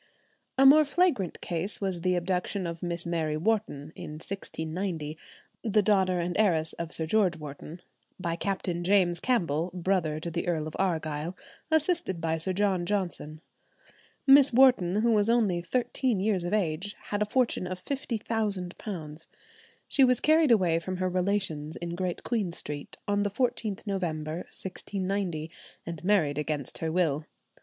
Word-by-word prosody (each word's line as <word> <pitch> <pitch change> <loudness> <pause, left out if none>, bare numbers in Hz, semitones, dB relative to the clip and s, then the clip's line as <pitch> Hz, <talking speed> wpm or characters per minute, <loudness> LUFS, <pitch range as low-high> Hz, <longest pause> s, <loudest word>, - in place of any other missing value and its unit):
A 270 - +6
more 300 +3 +9
flagrant 300 - +1
case 175 +4 -3
was 190 -4 -1
the 180 +1 +2
abduction 180 +2 -1
of 170 -1 -5
Miss 175 -1 -3
Mary 160 -3 -1
Wharton 160 -6 -1
in 150 - -7
1690, 160 -1 -4 0.5
the 215 -2 +3
daughter 190 -3 +3
and 175 +1 -2
heiress 165 -7 +2
of 170 -1 -5
Sir 160 - +1
George 185 -1 +2
Wharton, 150 +3 -9 0.4
by 170 -2 -2
Captain 180 -2 -2
James 180 -2 +3
Campbell, 175 - 0
brother 175 -4 0
to 170 +2 -5
the 170 +2 -3
Earl 160 -3 0
of 155 - -7
Argyll, 160 -2 -1 0.3
assisted 315 - +1
by 165 0 0
Sir 165 +4 +1
John 190 -2 +1
Johnson. 175 -6 -2 0.8
Miss 275 0 +8
Wharton, 230 -7 +5
who 235 - +4
was 210 0 +3
only 210 -7 +2
thirteen 245 +2 0
years 195 -2 +1
of 175 - -3
age, 195 -1 -1 0.2
had 205 0 0
a - - +3
fortune 230 -5 +1
of 185 0 -4
£50,000. 200 - -3 0.6
She 275 - +4
was 250 -2 +4
carried 315 -1 +4
away 180 -8 +4
from 185 +2 -4
her 185 0 0
relations 180 -5 -1
in 170 0 -5
Great 180 0 -3
Queen 215 -7 -1
Street, 145 -3 -5
on 205 0 +1
the 205 - +1
14th 220 -2 -1
November, 165 -6 -2
1690, 185 -4 -3 0.3
and 165 -2 -6
married 165 -7 +2
against 150 -3 -3
her 160 -1 -2
will. 160 -4 +1
185 Hz, 155 wpm, -28 LUFS, 165-205 Hz, 0.8 s, more